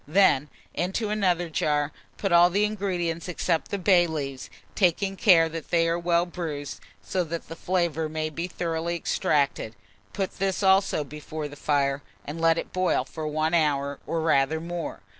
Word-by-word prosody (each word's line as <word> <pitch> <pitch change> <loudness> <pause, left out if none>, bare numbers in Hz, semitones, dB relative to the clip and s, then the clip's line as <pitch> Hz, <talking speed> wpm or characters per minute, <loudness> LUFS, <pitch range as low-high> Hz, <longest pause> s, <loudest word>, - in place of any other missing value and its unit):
Then, 150 -4 +4 0.2
into 190 +5 -1
another 180 -5 +1
jar, 150 -2 0 0.3
put 195 - -2
all 175 +1 +7
the 200 +4 +1
ingredients 180 -6 -2
except 170 -1 -1
the 200 - -2
bay 180 -2 +4
leaves, 140 -5 -5 0.2
taking 195 +1 +1
care 175 -5 +5
that 165 -1 -7
they 165 -1 +3
are 165 +1 0
well 170 0 +2
bruised, 155 -5 -5 0.2
so 185 -1 -1
that 165 +1 -5
the 165 - -6
flavour 170 -3 -1
may 155 0 -3
be 170 +3 -3
thoroughly 170 -1 -2
extracted; 140 -8 0 0.4
put 195 -2 -4
this 195 +1 0
also 190 -4 +3
before 150 +1 -6
the 145 - -11
fire, 140 -1 0 0.2
and 155 +3 -6
let 165 0 +4
it - - -5
boil 185 0 +1
for 155 -1 -6
1 155 +2 0
hour, 140 -4 +1
or 165 -1 -1
rather 155 -1 +2
more. 170 +1 -5
165 Hz, 170 wpm, -26 LUFS, 155-180 Hz, 0.4 s, all